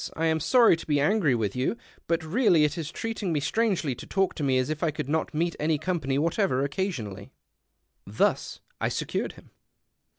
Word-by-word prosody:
I 165 - 0
am 160 0 +2
sorry 235 - +5
to - - -10
be 145 -2 +2
angry 155 - +3
with 105 -4 -2
you; 130 - -1 0.3
but 165 0 0
really 170 -2 +3
it 150 - +1
is 160 -3 -4
treating 225 -4 -3
me 155 - +1
strangely 175 - 0
to - - -10
talk 195 -1 +1
to 150 - -5
me 135 -2 +2
as 130 +4 0
if 155 - -4
I 165 - +2
could 145 -3 -4
not 160 +2 -1
meet 170 +2 0
any 155 +1 +1
company 155 -4 -1
whatever 160 -3 +1
occasionally, 140 - -3 0.4
" - - -50 0.2
Thus - - 0 0.2
I - - 0
secured - - -3
liiin. - - -16
160 Hz, 200 wpm, -27 LUFS, 140-185 Hz, 0.4 s, sorry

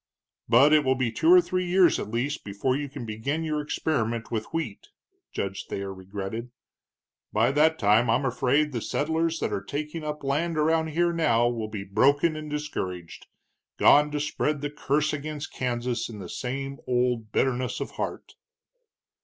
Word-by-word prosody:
"But 135 +6 +6
it 155 -1 +5
will 130 -1 +2
be 125 -3 0
two 325 - +3
or 360 0 +9
three 185 - -2
years, 180 -1 +4
at - - -5
least, 130 +7 -2
before 105 +6 -1
you 145 0 -3
can 135 -3 -7
begin 115 +9 -3
your 155 -1 -1
experiment 115 -7 -2
with 110 -2 -2
wheat," 140 -11 -5 0.4
Judge 100 0 -4
Thayer 100 0 -4
regretted. 95 +5 -6 0.8
"By 110 +4 +3
that 155 +3 +3
time 110 +2 +3
I'm 125 +5 +2
afraid 135 +4 +1
the 120 -4 -3
settlers 160 +6 -1
that - - -1
are 100 - -1
taking 150 +8 -5
up 150 -1 -5
land 155 +4 0
around 160 +1 +2
here 170 +2 +1
now 135 -8 +3
will 115 -3 -3
be 105 -2 -5
broken 140 - +3
and 155 0 -6
discouraged, 95 - -5 0.5
gone 150 +1 +6
to 150 0 -2
spread 150 0 -1
the 145 0 -3
curse 150 +1 0
against 150 0 -5
Kansas 120 -1 -2
in 110 - -8
the 95 -4 -8
same 135 +2 -4
old 125 -3 0
bitterness 130 0 0
of - - -4
heart." - - -5
135 Hz, 170 wpm, -26 LUFS, 115-150 Hz, 0.8 s, or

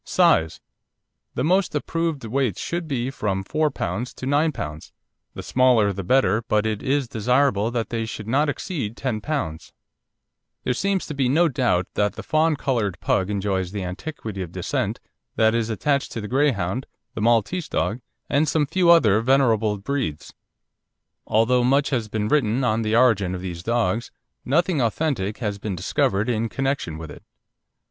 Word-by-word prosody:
SIZE 80 -1 +2 0.8
The - - -1
most 180 +2 +2
approved 160 -2 -2
weights 125 -3 -1
should 170 -1 -3
be 130 -3 -2
from 100 -7 -2
4 155 +9 0
lb. 110 +1 -4
to - - -7
9 145 +4 +2
lb., 75 - -7 0.4
the - - -6
smaller 125 -6 +3
the 95 +1 -5
better, 110 0 +3
but 110 -2 0
it 110 -2 -1
is 135 -1 0
desirable 115 -1 +1
that 120 -2 -2
they 115 -1 -2
should 110 -1 -7
not 145 +6 +2
exceed 140 - -4
10 120 -5 -2
lb. 130 - -3 0.9
There - - 0
seems 195 +7 0
to - - -5
be 135 -3 +1
no 165 +6 +4
doubt 120 -9 +1
that 105 -1 +1
the - - -8
fawn 155 +1 +2
coloured 115 -9 -1
Pug 95 +1 0
enjoys 95 -3 -1
the 100 -2 -4
antiquity 100 - -6
of 90 -3 -6
descent - - -2 0.4
that 110 0 +3
is 115 -1 0
attached 140 +6 0
to - - -4
the 105 - -5
Greyhound, 125 -4 0 0.3
the - - -5
Maltese 120 - +1
dog, 115 +4 -1 0.3
and 150 +2 +2
some 155 -1 +2
few 170 +4 +2
other 110 -12 +6
venerable 115 -5 +2
breeds. 100 - -3 0.9
Although 120 +3 +3
much 140 +4 +2
has 115 -5 -1
been 105 0 -1
written 125 -2 +2
on 115 -2 +1
the 110 0 0
origin 105 -7 +3
of 90 - -6
these 90 -2 -5
dogs, 115 +2 0 0.3
nothing 165 +2 +1
authentic 115 -4 -1
has 105 -4 -3
been 100 -2 -3
discovered 95 +4 0
in 115 -1 0
connection 135 - -2
with 80 -2 -8
it. - - -12
115 Hz, 170 wpm, -23 LUFS, 105-140 Hz, 0.9 s, other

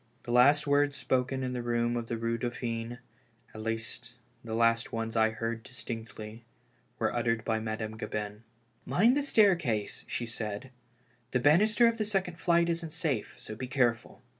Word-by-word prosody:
The 120 - -5
last 140 +4 +5
words 145 0 +2
spoken 130 +1 0
in 125 0 -2
the 125 - -2
room 120 0 0
of 120 -1 -3
the 115 - -2
Eue 115 +1 -1
Dauphine 120 -1 -3 0.3
— 115 -1 -32
at 110 - -7
least 115 +2 -4 0.3
the 110 -1 -4
last 115 0 +2
ones 115 0 -3
I 110 0 +4
heard 115 +1 -3
distinctly 115 -1 -8 0.3
— 125 -1 -38
were - - 0
uttered 115 -1 0
by 110 -1 +1
Madame 110 0 -4
Gabin. 105 -1 -4 0.4
"Mind 205 - +4
the 290 - +2
staircase," 170 - +2
she 120 - -3
said, 110 +1 -5 0.6
"the 125 - +3
banister 210 - +5
of 230 0 +2
the 215 - +1
second 190 -5 -1
flight 170 0 +3
isn't 165 -2 -2
safe, 155 -9 -2
so - - -8
be 125 +4 -5
careful." 125 -3 0
120 Hz, 175 wpm, -30 LUFS, 115-145 Hz, 0.6 s, last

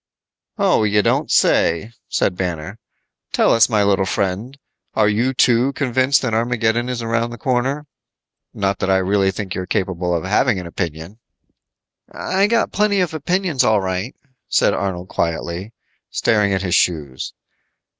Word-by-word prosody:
"Oh, - - +3
you 105 -1 +2
don't - - +1
say," 85 +7 +2 0.2
said 90 - 0
Banner. 90 +2 -4 0.5
"Tell - - +3
us, 115 +1 +5
my 105 -3 +2
little 100 -1 +2
friend, 100 +9 -2 0.4
are 110 -1 +3
you 115 +5 +1
too, 125 +1 +3
convinced 130 0 +1
that 120 -3 -1
Armageddon 120 +1 0
is 120 -2 -3
around 115 +1 0
the 120 - -8
corner? 130 +4 -1 0.7
Not 100 -1 -2
that 95 - -1
I 95 - +4
really 95 +1 +2
think 95 0 -4
you're 90 0 -4
capable 90 -3 -1
of 85 - -2
having 105 +2 +2
an 90 - -7
opinion." 85 +3 -5 0.9
"I 195 +2 0
got 230 +1 +1
plenty 205 -1 +1
of 180 -3 0
opinions, 170 -1 0
all 110 -1 +3
right," 95 +5 -3 0.3
said - - +3
Arnold 95 -2 -3
quietly, 85 +5 -3 0.4
staring 105 -3 +1
at 95 0 0
his 90 -2 -1
shoes. 75 -8 0
105 Hz, 155 wpm, -19 LUFS, 95-125 Hz, 0.9 s, us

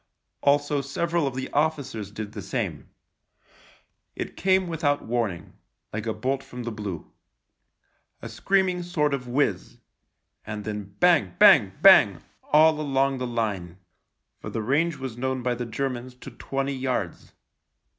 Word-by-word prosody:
Also 145 0 +2
several 165 +3 -1
of 130 - -4
the 130 0 -3
officers 140 -9 -1
did 105 0 -7
the 110 -2 -7
same. - - -4 1.3
It - - -5
came 190 0 +2
with 165 -2 -6
out 145 -1 +2
warning 115 -7 -3 0.2
— - - -46
like 110 +2 -4
a 110 - 0
bolt 135 +1 -1
from 125 -2 -9
the 120 - -4
blue. 105 -6 -6 1.1
A - - -8
screaming 190 -2 0
sort 155 -4 0
of 130 -2 -3
whizz 120 -7 -1 0.3
— - - -53
and 105 -1 -5
then 105 -2 -6
bang, - - -38
THE 180 -1 +7
LIEUTENANT 95 - -8
2.5 - - -31
bang, - - +7 0.4
bang - - -16 0.3
all 155 +1 +5
along 135 -2 +1
the 125 - -2
line: 100 -7 -3 0.6
for - - -7
the 110 - -3
range 155 +8 +1
was 130 -3 -6
known 130 0 -2
by 125 0 +1
the 120 0 -5
Germans 125 +1 -4
to 125 - -11
twenty 135 +1 -3
yards. 130 -9 -3
130 Hz, 165 wpm, -25 LUFS, 110-145 Hz, 1.3 s, THE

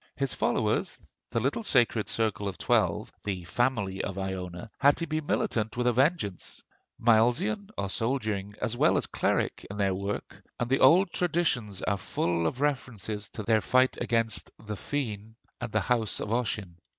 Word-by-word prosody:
His - - 0
followers, - - 0 0.3
the - - 0
little - - 0
sacred 120 - +3
circle 110 -2 -1
of 95 - -4
twelve, - - +1
'the 95 -3 -3
Family 100 0 0
of 95 - -4
Iona,' 95 0 -5
had 140 +1 +5
to 170 - -1
be 155 0 -1
militant 110 -6 -1
with 125 - 0
a 125 - +4
vengeance: 130 - 0 0.4
Milesian 125 - +3
or 100 - -1
soldiering 105 -3 -2
as 115 - -1
well - - +4
as - - +1
cleric, - - 0
in 100 - -6
their 100 -2 +2
work; 100 +2 -4 0.2
and 120 +1 -2
the 135 - +4
old 175 +7 +6
traditions 150 - 0
are 100 0 0
full 85 -2 0
of 130 - -3
references 110 -7 -2
to 110 - -6
their 110 +1 +3
fight 130 +3 +3
against 115 -2 0 0.2
the 105 - -4
Féinne 110 -3 -4 0.3
and 120 -2 -4
the 110 - +2
house 115 +2 0
of - - -4
Ossian. 105 -7 -2
110 Hz, 170 wpm, -28 LUFS, 100-130 Hz, 0.4 s, old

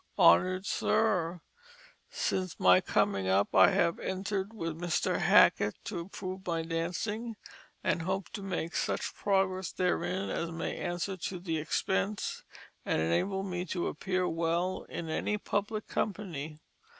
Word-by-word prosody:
"HONOUR'D 185 - +5
SIR: 180 -6 +1 0.7
"Since 185 -2 -2
my 90 0 +6
coming 95 -1 +1
up 95 +2 +2
I 95 - +8
have 170 -1 +2
entered 190 +1 -2
with 165 -8 -4
Mr. 175 -2 0
Hackett 105 0 +5
to 195 -5 -4
improve 185 +1 -6
my 165 -1 0
Dancing, 185 +8 -3 0.5
and 170 - +1
hope 190 +2 -2
to 205 - -6
make 180 -3 -3
such - - -1
Progress 190 -2 0
therein 185 +1 -1
as 170 - -2
may 165 0 -3
answer 175 +2 -3
to 180 +1 -4
the 165 -3 -2
Expense, 105 -9 -1 0.4
and - - 0
enable 185 - +1
me 180 -2 -3
to 175 0 -2
appear 185 +3 -1
well 170 +3 -1
in 165 - -5
any 210 +6 -1
Public 210 +1 -2
Company. 165 -8 -3
180 Hz, 140 wpm, -31 LUFS, 165-195 Hz, 0.7 s, I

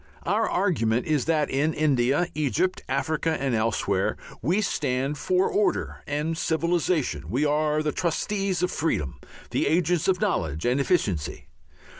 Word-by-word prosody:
Our 210 +5 +1
argument 125 - +1
is 150 -4 +1
that 155 -3 +1
in 145 +4 +1
India, 140 +1 +2
Egypt, 150 - 0
Africa 155 +4 0
and 135 -2 -1
elsewhere, 110 -1 0 0.2
we 170 - +1
stand 140 -5 -1
for 185 +1 +2
order 210 - 0
and 150 +3 -1
civilization, 160 - 0
we 130 +9 +1
are 150 +1 +1
the 150 - 0
trustees 190 +2 -1
of 180 - +1
freedom, 75 - -1 0.3
the - - +1
agents 170 +1 +2
of 185 -2 +2
knowledge 80 - -1
and 125 +3 +2
efficiency. 95 - -1
150 Hz, 140 wpm, -25 LUFS, 130-175 Hz, 0.3 s, India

